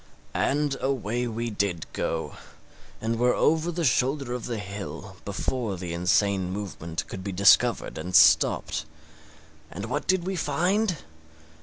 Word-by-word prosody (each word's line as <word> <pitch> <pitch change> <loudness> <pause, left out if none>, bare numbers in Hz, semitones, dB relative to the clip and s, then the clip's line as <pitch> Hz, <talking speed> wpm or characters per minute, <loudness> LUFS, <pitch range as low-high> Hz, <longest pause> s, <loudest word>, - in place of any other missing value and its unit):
And 145 0 +1
away 125 -2 -1
we 115 0 -3
did 100 -5 -1
go, 80 -2 -2 0.6
and 115 +1 -2
were 125 0 +3
over 160 +2 +2
the 170 -1 -2
shoulder 130 +1 +1
of 125 -2 -4
the 120 -2 -3
hill 100 -1 -7
before 115 -7 -2
the 85 -1 -5
insane 95 +2 +2
movement 85 -5 -5
could 95 - -7
be 100 - -3
discovered 100 -3 +4
and 90 +3 -3
stopped. - - +4 0.8
And 100 +4 -6
what 145 +6 -3
did 185 -2 +2
we 190 +1 -2
find? 185 +3 +1
115 Hz, 140 wpm, -26 LUFS, 95-140 Hz, 0.8 s, discovered